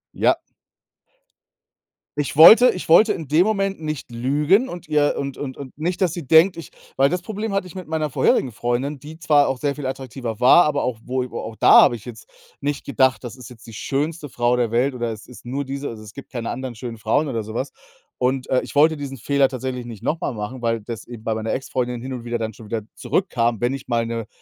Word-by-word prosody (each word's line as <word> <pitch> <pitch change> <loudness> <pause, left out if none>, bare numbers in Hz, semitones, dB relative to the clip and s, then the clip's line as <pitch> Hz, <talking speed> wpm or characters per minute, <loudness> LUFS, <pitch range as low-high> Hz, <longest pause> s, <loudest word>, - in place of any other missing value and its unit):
Ja. - - +2 1.8
Ich 145 -1 -2
wollte 220 - +9
ich 180 - -7
wollte 210 +7 +6
in 155 -5 -7
dem 160 +5 +4
Moment 195 -4 -1
nicht 155 -5 -5
lügen 145 - +2
und 175 -9 -9
ihr 150 -1 +2
und 140 -1 -4
und 130 -3 -5
und 135 -2 -10
nicht, 175 +5 -2
dass 180 -3 +3
sie 170 -6 -7
denkt, 165 +5 +5
ich 165 - -9 0.3
weil 135 +1 +4
das 180 +2 -2
Problem 215 +2 -4
hatte 195 -1 -1
ich 180 - -13
mit 185 -1 -7
meiner 155 -1 -1
vorherigen 130 -1 +2
Freundin, 120 +5 -2
die 150 +3 -11
zwar 150 -4 +3
auch 135 - -1
sehr 140 +2 -1
viel 145 - -6
attraktiver 130 -4 -5
war, 150 +8 +7
aber 150 -2 0
auch 125 -3 -2
wo 130 0 -1
i 125 - -9
wo - - -5
auch 115 - -7
da - - +7
habe 125 - +4
ich 110 - -11
jetzt 115 -2 -11 0.3
nicht 145 0 -3
gedacht, 130 -1 +2
das 120 +1 -7
ist 125 -3 -11
jetzt 120 -2 -15
die 115 - -11
schönste 150 +7 -3
Frau 120 -1 0
der 120 -3 0
Welt 125 +4 +1
oder 120 -2 -3
es 110 - -11
ist 125 - -14
nur 135 +4 -3
diese 140 +1 -5
also, 110 -2 -9
es 105 -1 -12
gibt 140 - -11
keine 120 -3 -4
anderen 130 -2 -5
schönen 115 +1 -7
Frauen 115 +8 0
oder 115 -4 -2
so 110 +1 -8
was. 130 +4 -3 0.5
Und, 130 +1 0
äh, 130 - +3
ich - - -10
wollte 155 +2 +5
diesen 140 -2 -6
Fehler 140 +3 +2
tatsächlich 130 -1 -5
nicht 115 -4 -10
noch 160 - -1
mal 140 - -2
machen, 110 +4 -6
weil 115 -1 0
das 115 +1 -8
eben 120 -3 -10
bei 110 - -1
meiner 110 0 -3
Ex-Freundin 125 -2 -2
hin 130 +1 -6
und 125 -2 -6
wieder 120 0 -2
dann 110 -1 -4
schon 110 +1 -13
wieder 110 0 -3
zurückkam, 120 - 0
wenn 120 +2 +1
ich 135 - -7
mal 115 -1 0
'ne 115 -1 -4
130 Hz, 245 wpm, -22 LUFS, 120-150 Hz, 1.8 s, wollte